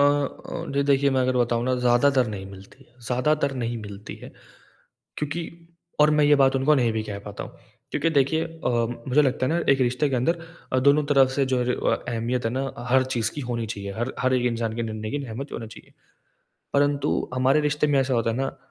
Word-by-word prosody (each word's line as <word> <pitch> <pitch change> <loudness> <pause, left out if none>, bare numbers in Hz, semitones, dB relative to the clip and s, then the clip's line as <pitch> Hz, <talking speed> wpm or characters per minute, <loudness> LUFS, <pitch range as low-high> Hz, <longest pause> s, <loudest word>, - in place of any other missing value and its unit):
अ, 145 -1 -1
जी 140 - +2
देखिए 140 0 +3
मैं 130 - +3
अगर 130 0 +1
बताऊँ 120 -1 +1
ना 130 0 +1
ज़्यादातर 125 +1 +4
नहीं 95 -1 -7
मिलती 100 +7 -14 0.2
ज़्यादातर 140 +2 +1
नहीं 115 +1 -2
मिलती 100 0 -9
है। - - -8 0.9
क्योंकि 150 +3 -3 0.6
और 150 0 +6
मैं 150 - +5
ये 145 0 +6
बात 135 0 +4
उनको 140 +3 +3
नहीं 120 -4 +2
भी 110 -1 -1
कह 100 - -4
पाता 100 0 -6
हूँ। - - -14 0.3
क्योंकि 165 - 0
देखिए 160 +4 +2
अ, 165 -3 -4 0.4
मुझे 150 +4 +4
लगता 130 -1 +1
है 155 - 0
ना 170 - +1
एक 135 - 0
रिश्ते 125 +4 +1
के 130 - 0
अंदर 165 +8 +1 0.3
अ, 130 - +3
दोनों 140 +2 +4
तरफ़ 135 -2 +5
से 140 -2 +1
जो 125 - +1 0.3
अ, - - +4
अहमियत 120 +1 -2
है - - 0
ना 135 0 -2 0.2
हर 130 0 +4
चीज़ 110 -1 0
की 145 - -4
होनी 115 -2 -2
चाहिए। 100 -1 -6
हर 120 +3 -2
हर 130 0 +2
एक 125 -1 +1
इंसान 115 -1 -3
के 115 - -1
निर्णय 110 -1 -4
की 145 -1 -3
अहमियत 130 +6 -7
होनी 115 - -5
चाहिए। - - -15 0.8
परंतु 145 0 +1
हमारे 135 +4 +3
रिश्ते 150 0 +1
में 140 -2 +3
ऐसा 130 -1 0
होता 115 -1 +1
है - - -3
ना, 135 0 -3
130 Hz, 220 wpm, -24 LUFS, 120-145 Hz, 0.9 s, और